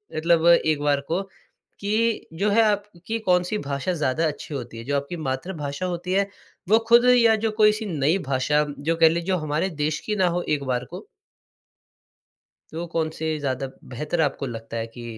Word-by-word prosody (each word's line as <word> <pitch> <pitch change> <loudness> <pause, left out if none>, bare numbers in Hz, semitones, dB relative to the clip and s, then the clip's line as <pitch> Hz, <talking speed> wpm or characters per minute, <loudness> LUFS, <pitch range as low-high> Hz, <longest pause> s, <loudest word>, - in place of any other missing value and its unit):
मतलब 165 +1 +3
एक 155 -3 +4
बार 145 -1 +2
को 170 +4 0 0.6
कि 220 +3 0
जो 200 +6 0
है, 215 +3 +4
आपकी 205 0 -1
कौन-सी 180 -1 +1
भाषा 140 +1 -2
ज़्यादा 155 -1 0
अच्छी 150 0 -6
होती 120 -3 -6
है 115 - -7
जो 145 +2 -1
आपकी 140 +5 -2
मातृभाषा 145 +2 -4
होती 180 0 -3
है 195 +1 +2 0.4
वो 220 +2 +6
खुद 235 +1 +6
या 230 -2 +5
जो 220 0 -1
कोई-सी 215 0 +3
नई 160 -1 +1
भाषा, 140 +3 +2 0.2
जो 165 +3 0
कह 165 -1 +6
लें 170 +1 -1
जो 185 0 +1
हमारे 155 +4 -1
देश 155 +1 0
की 210 - -1
ना 185 -2 +3
हो 175 +1 0
एक 150 -2 0
बार 125 -1 -1
को - - -9 1.7
तो 165 +2 -4
कौन 160 -1 0
से 160 0 -5
ज़्यादा 135 -2 -2 0.2
बेहतर 150 +7 -3
आपको 140 -1 -1
लगता 115 -1 -7
है 115 - -2
कि 120 -1 -9
165 Hz, 185 wpm, -24 LUFS, 140-195 Hz, 1.7 s, वो